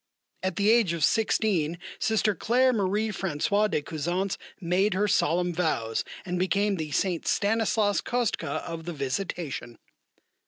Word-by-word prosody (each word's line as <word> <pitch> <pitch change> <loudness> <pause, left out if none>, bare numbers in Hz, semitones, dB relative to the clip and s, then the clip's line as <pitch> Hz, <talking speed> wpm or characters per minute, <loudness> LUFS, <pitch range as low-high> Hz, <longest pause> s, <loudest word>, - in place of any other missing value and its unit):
At 185 -2 -2
the 205 +1 +3
age 225 -7 +4
of 165 -3 -2
sixteen, 185 -6 +2 0.2
Sister 220 -1 +2
Claire 255 +5 +2
Marie 210 +1 0
Françoise 200 +2 0
de 150 - -1
Cusance 175 +6 -2 0.2
made 185 +2 +1
her 205 +2 +2
solemn 175 -1 +2
vows 135 -10 0 0.2
and 180 -1 -2
became 195 +2 +1
the 155 -2 -4
Saint 175 +3 -1
Stanislaus 215 -1 +2
Kostka 235 - -1
of 165 -1 -6
the 175 - -4
Visitation. 140 -3 -4
185 Hz, 140 wpm, -27 LUFS, 165-210 Hz, 0.2 s, age